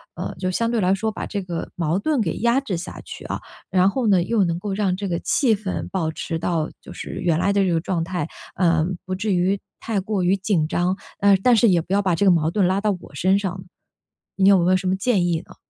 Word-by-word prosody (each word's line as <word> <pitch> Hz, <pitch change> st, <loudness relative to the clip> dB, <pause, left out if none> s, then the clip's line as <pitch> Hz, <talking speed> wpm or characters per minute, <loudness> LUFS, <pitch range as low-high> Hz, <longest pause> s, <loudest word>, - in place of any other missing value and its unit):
呃， -, -, -5 dB
就 185 Hz, -1 st, -1 dB
相 230 Hz, +5 st, 0 dB
对 235 Hz, -3 st, 0 dB
来 185 Hz, +1 st, +3 dB
说 220 Hz, +3 st, -1 dB
把 215 Hz, -, -5 dB
这 200 Hz, -2 st, -3 dB
个 175 Hz, -2 st, -5 dB
矛 170 Hz, +1 st, 0 dB
盾 285 Hz, +5 st, 0 dB
给 215 Hz, -, 0 dB
压 235 Hz, +4 st, +3 dB
制 250 Hz, -10 st, -3 dB
下 170 Hz, -, -6 dB
去 -, -, -9 dB
啊， -, -, -4 dB, 0.3 s
然 185 Hz, +1 st, +4 dB
后 240 Hz, +2 st, -1 dB
呢， 185 Hz, -4 st, +4 dB
又 215 Hz, 0 st, +2 dB
能 170 Hz, -1 st, -1 dB
够 200 Hz, 0 st, -4 dB
让 195 Hz, -2 st, 0 dB
这 200 Hz, -1 st, -3 dB
个 170 Hz, -2 st, -1 dB
气 235 Hz, -6 st, +2 dB
氛 195 Hz, -2 st, -4 dB
保 165 Hz, -4 st, -1 dB
持 165 Hz, +1 st, -4 dB
到 165 Hz, -1 st, -1 dB
就 -, -, -12 dB
是 -, -, -6 dB
原 170 Hz, -2 st, +1 dB
来 200 Hz, +2 st, +2 dB
的 200 Hz, -, +3 dB
这 180 Hz, -, +1 dB
个 165 Hz, -, +2 dB
状 170 Hz, -1 st, -2 dB
态， 175 Hz, -3 st, -3 dB, 0.3 s
呃， 165 Hz, -3 st, +2 dB, 0.2 s
不 185 Hz, 0 st, -3 dB
至 205 Hz, 0 st, -1 dB
于 185 Hz, +3 st, +2 dB, 0.2 s
太 210 Hz, -4 st, -2 dB
过 205 Hz, -1 st, -2 dB
于 180 Hz, +2 st, +3 dB
紧 190 Hz, -5 st, 0 dB
张， 180 Hz, +3 st, 0 dB, 0.2 s
嗯， 200 Hz, -1 st, +5 dB
但 245 Hz, +1 st, +5 dB
是 225 Hz, 0 st, +5 dB
也 175 Hz, -3 st, +3 dB
不 180 Hz, +4 st, -5 dB
要 200 Hz, -, +3 dB
把 185 Hz, -3 st, +1 dB
这 200 Hz, +5 st, +1 dB
个 190 Hz, -, +7 dB
矛 165 Hz, -1 st, +2 dB
盾 190 Hz, -2 st, +2 dB
拉 190 Hz, +2 st, +1 dB
到 210 Hz, -1 st, +2 dB
我 140 Hz, -, -14 dB
身 190 Hz, +5 st, +2 dB
上， 185 Hz, -2 st, -4 dB, 0.7 s
你 195 Hz, 0 st, +3 dB
有 195 Hz, -, +7 dB
没 180 Hz, -, +3 dB
有 185 Hz, -, +5 dB
什 185 Hz, 0 st, -4 dB
么 185 Hz, -, +2 dB
建 190 Hz, -3 st, +1 dB
议 165 Hz, -2 st, +1 dB
呢？ -, -, -15 dB
190 Hz, 285 characters per minute, -22 LUFS, 175-205 Hz, 0.7 s, 个